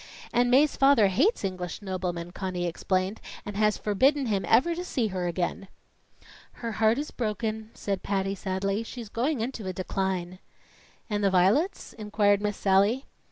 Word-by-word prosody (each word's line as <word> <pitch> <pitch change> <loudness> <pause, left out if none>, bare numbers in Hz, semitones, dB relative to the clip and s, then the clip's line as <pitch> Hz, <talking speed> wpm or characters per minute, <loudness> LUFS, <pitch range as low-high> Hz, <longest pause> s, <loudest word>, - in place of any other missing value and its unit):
"And 245 +1 +3
Mae's 275 +4 +4
father 270 -7 +5
hates 275 - +2
English 185 0 -4
noblemen," 180 -3 -3
Conny 180 -2 -3
explained, 185 +4 -1 0.2
"and 205 - -6
has 210 0 +2
forbidden 265 +7 +2
him 205 -4 0
ever 265 +10 +4
to 350 +2 -4
see 245 -11 -1
her 185 -2 -2
again." 175 +2 -2 0.9
"Her 230 -1 -5
heart 220 +1 +2
is 295 +2 -3
broken," 220 -1 -3
said 195 -2 -3
Patty 195 -1 -1
sadly. 195 +1 -2
"She's 230 -1 -8
going 250 +4 -1
into 230 -4 -4
a 185 - -2
decline." 185 -1 -3 0.7
"And 210 -2 -1
the 200 - +4
violets?" 200 - +2
inquired 210 -2 +1
Miss 205 -1 -1
Sallie. 200 +7 +3
205 Hz, 160 wpm, -27 LUFS, 190-235 Hz, 0.9 s, father